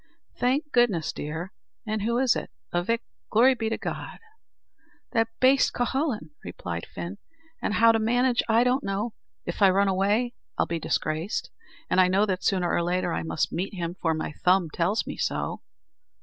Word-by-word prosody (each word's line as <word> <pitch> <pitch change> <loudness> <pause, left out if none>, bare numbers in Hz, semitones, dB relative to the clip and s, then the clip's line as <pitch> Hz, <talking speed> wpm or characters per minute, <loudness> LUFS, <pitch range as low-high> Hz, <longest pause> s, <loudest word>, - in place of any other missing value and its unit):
"Thank 280 +5 +1
goodness, 215 -10 +2
dear! 160 +7 -5 0.3
an' 215 0 -1
who 230 +3 0
is 255 -1 +3
it, - - -4 0.2
avick? 205 +7 +1 0.3
Glory 245 +5 +5
be 225 -3 -2
to 225 - -1
God!" - - -5 0.9
"That 225 -2 +2
baste, 265 +1 +4
Cuhullin," 245 - -1
replied 85 -1 -5
Fin; 90 +2 -7 0.4
"and 215 - -1
how 230 0 +6
to 225 - +1
manage 245 +2 +2
I 225 +2 +5
don't 255 +3 +1
know. 205 +3 -2 0.3
If - - -5
I 195 - +8
run 195 +2 +3
away, 205 +6 +1 0.2
I - - +3
am 170 0 -2
disgraced; 155 +4 -2 0.4
and 185 - +4
I 185 - +5
know 195 +3 +3
that 185 -3 -2
sooner 180 -3 +1
or - - +2
later 180 +2 0
I 80 - -1
must 80 0 -1
meet 190 +4 -3
him, 170 -1 -3
for 160 -2 +1
my 155 - -3
thumb 180 +1 +2
tells 180 +8 0
me - - -6
so." - - -2
200 Hz, 175 wpm, -26 LUFS, 170-235 Hz, 0.9 s, I